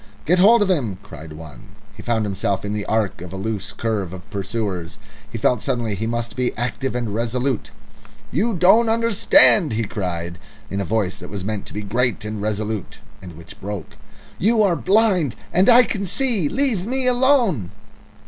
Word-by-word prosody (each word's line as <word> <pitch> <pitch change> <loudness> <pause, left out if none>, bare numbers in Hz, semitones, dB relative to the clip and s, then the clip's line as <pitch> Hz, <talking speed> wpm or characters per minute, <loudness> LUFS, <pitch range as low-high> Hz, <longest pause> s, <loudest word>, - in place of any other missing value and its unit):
"Get 180 +3 +3
hold 215 +4 +6
of 200 - -2
him!" 120 - -1
cried 80 0 -11
one. 75 -5 -12 0.2
He 110 - -10
found 110 -1 -1
himself 100 0 -2
in 100 - -3
the 105 -1 -4
arc 105 -5 -1
of 90 - -8
a - - -6
loose 105 +1 -4
curve 105 -6 -3
of 90 -1 -10
pursuers. 100 -3 -4 0.3
He 115 - -4
felt 115 0 +1
suddenly 115 -3 -2
he 110 +3 -3
must 115 -1 -3
be 125 -1 -2
active 120 +3 -3
and 120 -4 -3
resolute. 120 +3 -2 0.6
"You 225 0 0
don't 195 +7 +5
understand," 220 - +5
he 115 +1 -1
cried 85 -5 -4 0.3
in 100 0 -2
a - - -3
voice 105 -2 -1
that 90 - -10
was 100 -3 -6
meant 105 -1 -4
to - - -10
be 105 - -4
great 115 +1 -1
and 105 -1 -5
resolute, 105 -1 -3 0.2
and 90 -4 -11
which 85 +1 -13
broke. 100 -4 -6 0.4
"You 220 +2 +3
are 185 -4 +2
blind, 190 - +2 0.2
and 185 +5 +4
I 245 +1 +8
can 200 -5 -3
see. 220 - +1
Leave 245 -9 0
me 260 +1 -1
alone!" 245 - +2
110 Hz, 185 wpm, -21 LUFS, -, 0.6 s, I